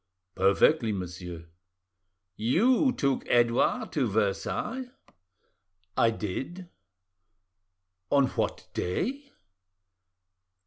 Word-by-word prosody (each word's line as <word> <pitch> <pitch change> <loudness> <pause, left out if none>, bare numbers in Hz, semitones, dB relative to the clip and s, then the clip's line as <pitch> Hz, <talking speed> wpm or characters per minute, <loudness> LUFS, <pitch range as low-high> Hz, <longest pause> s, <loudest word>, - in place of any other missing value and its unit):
"Perfectly, 110 +6 +3
monsieur." 90 -3 -6 0.9
"You 235 - +3
took 140 - 0
Edouard 120 - +2
to 140 -6 +1
Versailles?" 110 - -1 1.1
"I 115 - +4
did." 130 - -5 1.4
"On 140 -1 +5
what - - -3
day?" 270 - -2
120 Hz, 70 wpm, -28 LUFS, -, 1.4 s, On